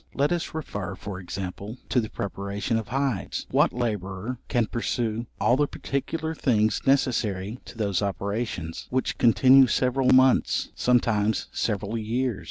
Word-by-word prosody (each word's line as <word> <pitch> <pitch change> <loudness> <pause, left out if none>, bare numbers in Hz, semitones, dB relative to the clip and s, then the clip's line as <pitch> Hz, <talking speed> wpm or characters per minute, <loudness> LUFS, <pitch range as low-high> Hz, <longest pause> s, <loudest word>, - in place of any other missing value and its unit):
Let 145 +3 +2
us 175 -2 -2
refer, 100 - -4
for 95 0 -7
example, 95 +4 -6
to 125 - +3
the 110 - -5
preparation 100 +3 -3
of 110 - -7
hides: 135 -5 -2
what - - +4
labourer 110 0 -3
can 120 -3 +1
pursue 115 0 -2
all 120 - +4
the 145 +2 +2
particular 160 +5 -3
things 110 -8 +1
necessary 115 -5 +1
to - - -12
those 100 -4 0
operations, 100 -4 -3
which 130 +1 -1
continue 130 +3 +6
several 125 +2 +1
months, 130 0 +4
sometimes 110 -3 +1
several 105 +1 -2
years? 115 0 -1
115 Hz, 140 wpm, -26 LUFS, 100-130 Hz, -, continue